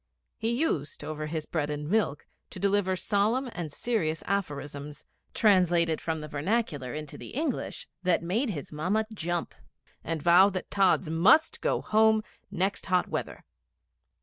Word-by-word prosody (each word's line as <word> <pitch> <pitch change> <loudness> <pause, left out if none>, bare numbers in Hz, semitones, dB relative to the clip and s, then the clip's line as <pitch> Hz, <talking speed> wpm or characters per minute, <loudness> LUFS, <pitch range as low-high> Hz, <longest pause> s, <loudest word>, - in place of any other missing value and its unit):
He 225 - 0
used, 235 - -1
over 155 0 -4
his 155 0 -3
bread 150 -3 -2
and 150 0 -4
milk, 200 -6 0 0.2
to - - -9
deliver 200 -1 +2
solemn 215 +7 +1
and 170 -5 -5
serious 160 -5 -1
aphorisms, 145 -6 -4 0.3
translated 175 -6 +3
from 160 -1 -2
the 150 - -6
vernacular 150 - -1
into 155 -1 -7
the - - -9
English, 295 -2 -3
that 180 -2 +2
made 220 +10 0
his 150 -9 -5
Mamma 185 +9 0
jump 175 -3 -3 0.5
and 165 0 -2
vow 175 +5 +6
that 185 -2 -5
Tods 190 -5 +3
must 195 - +4
go - - +1
Home 220 0 +4 0.3
next 190 +3 -1
hot 185 -1 +2
weather. - - -4
180 Hz, 150 wpm, -28 LUFS, 155-210 Hz, 0.5 s, vow